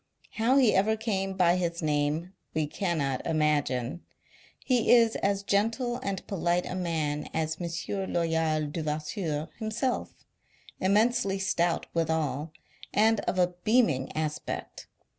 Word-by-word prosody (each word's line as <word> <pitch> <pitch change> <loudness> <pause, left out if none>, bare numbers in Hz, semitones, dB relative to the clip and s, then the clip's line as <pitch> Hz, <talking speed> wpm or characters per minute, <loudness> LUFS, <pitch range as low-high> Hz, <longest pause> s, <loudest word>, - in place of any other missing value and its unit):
How 235 +5 +2
he 250 -6 +5
ever 215 +3 +3
came 195 -3 -1
by 175 -1 +4
his 170 -1 -2
name, 150 +4 0 0.2
we 155 -1 +1
cannot 150 -5 -1
imagine. 150 -3 0 0.6
He 250 -3 +2
is 230 -2 +6
as 200 0 0
gentle 225 +5 0
and 195 -5 -4
polite 175 -2 0
a - - -5
man 160 -5 -2
as 160 0 -1
M. 175 +3 -3
Loyal 160 -2 +1
Devasseur 155 +1 -3
himself; 230 +3 -3 0.5
immensely 200 0 +2
stout 175 -3 0
withal, 160 -3 -1 0.4
and 220 +1 +3
of - - -2
a 180 -1 +2
beaming 195 - +2
aspect. 155 -1 -4
M. - - -43
175 Hz, 125 wpm, -28 LUFS, 155-205 Hz, 0.6 s, is